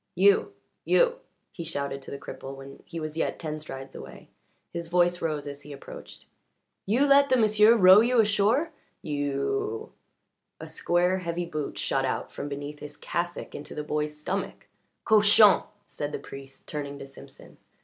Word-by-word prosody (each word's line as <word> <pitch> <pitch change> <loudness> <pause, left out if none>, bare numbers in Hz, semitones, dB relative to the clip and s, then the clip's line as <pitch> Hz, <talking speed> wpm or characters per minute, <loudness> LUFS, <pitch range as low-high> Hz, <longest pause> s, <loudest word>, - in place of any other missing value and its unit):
"You 195 +3 +4 0.3
you!" - - +3 0.3
he 170 - -7
shouted 140 -3 -4
to - - -10
the 140 - -5
cripple 135 0 -8
when 135 0 -12
he 165 - -6
was 155 -1 -5
yet - - -1
ten 155 -2 -5
strides 135 -3 -9
away. 65 -2 -11 0.4
His 170 -1 -4
voice 175 +1 +2
rose 150 -3 -2
as 140 0 -7
he 150 - -11
approached. 140 - -11 0.6
"You 240 +8 +3
let 280 0 +5
the 255 - +4
m'sieu' 215 0 +5
row 190 -2 +8
you 240 +1 +2
ashore! 215 +9 +2 0.3
You 410 - -2 0.3
" - - -55
A - - -8
square, 180 +2 +1
heavy 175 -1 -3
boot 155 -4 -5
shot 135 -1 0
out 130 - -2
from 145 - -5
beneath 145 +1 -6
his 145 0 -9
cassock 175 0 -4
into 145 - -8
the 150 - -3
boy's 150 0 -2
stomach. 190 +6 -4 0.4
"Cochon!" 210 -1 +6 0.2
said 145 -6 -5
the - - -1
priest, 135 0 -12
turning 145 -2 -5
to 140 - -8
Simpson. 135 0 -14
165 Hz, 170 wpm, -27 LUFS, 145-205 Hz, 0.6 s, row